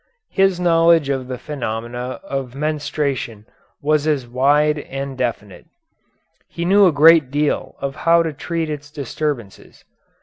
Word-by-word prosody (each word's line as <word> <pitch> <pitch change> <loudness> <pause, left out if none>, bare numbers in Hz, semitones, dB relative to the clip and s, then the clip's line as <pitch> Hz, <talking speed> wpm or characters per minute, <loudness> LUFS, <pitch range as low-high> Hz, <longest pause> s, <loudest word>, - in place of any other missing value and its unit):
His 195 -2 +2
knowledge 165 -3 +4
of 135 -2 -2
the 130 -1 -5
phenomena 120 -2 -5
of 135 -2 -5
menstruation 145 -7 -3 0.4
was 155 0 +1
as 145 -5 0
wide 145 +5 +2
and 135 -1 -6
definite. 105 -7 -4 0.8
He 170 - -5
knew 200 +2 +5
a - - +4
great 155 -1 +6
deal 145 +2 -1
of 140 +1 -4
how 170 0 +4
to 160 -2 -3
treat 165 +3 -3
its 145 -1 -6
disturbances. 140 -6 -5
145 Hz, 135 wpm, -20 LUFS, 130-155 Hz, 0.8 s, great